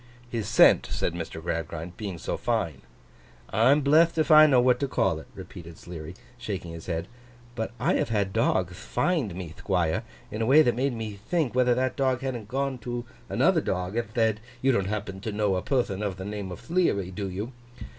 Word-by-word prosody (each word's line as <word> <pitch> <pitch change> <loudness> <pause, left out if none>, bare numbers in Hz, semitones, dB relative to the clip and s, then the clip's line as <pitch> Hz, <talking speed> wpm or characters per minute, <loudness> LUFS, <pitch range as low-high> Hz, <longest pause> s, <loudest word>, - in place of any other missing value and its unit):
'His 115 -4 -2
scent,' - - +6
said 85 - -1
Mr. 85 -1 -5
Gradgrind, 85 +1 -4
'being 100 -4 -5
so - - -3
fine.' - - -1 0.7
'I'm 130 +8 +4
bletht 160 +4 +4
if 155 -1 +2
I 155 0 +9
know 130 -4 +5
what 125 0 +4
to 140 - 0
call - - +1
it,' - - -12
repeated 85 -1 -10
Sleary, 85 -1 -8 0.2
shaking 100 -8 -5
his 80 -1 -9
head, 85 -2 -2 0.5
'but 110 -2 -3
I 125 - +2
have 150 - -1
had 100 -4 0
dogth - - +1
find 110 - -1
me, 90 -3 -6
Thquire, 90 0 0 0.3
in 110 +2 -4
a 110 - +1
way 150 +4 +7
that 120 - +2
made 135 +2 0
me 110 -3 -5
think 160 -8 +1
whether 125 -1 +3
that 130 0 0
dog 130 -3 +1
hadn't 125 -6 -4
gone 135 +1 -2
to 120 +1 -4 0.2
another 170 -2 +3
dog, 90 -2 -2
and 115 -3 -1
thed, 110 -2 +2 0.2
"You 135 +2 +3
don't 100 -6 +1
happen 100 -2 -4
to 110 +3 -4
know 105 -2 +1
a 90 - -1
perthon 110 -5 0
of 100 -3 -2
the 95 - -6
name 100 -2 -5
of 90 - -8
Thleary, 160 - 0
do 95 +1 -4
you? 100 +7 -5
110 Hz, 205 wpm, -27 LUFS, 95-130 Hz, 0.7 s, I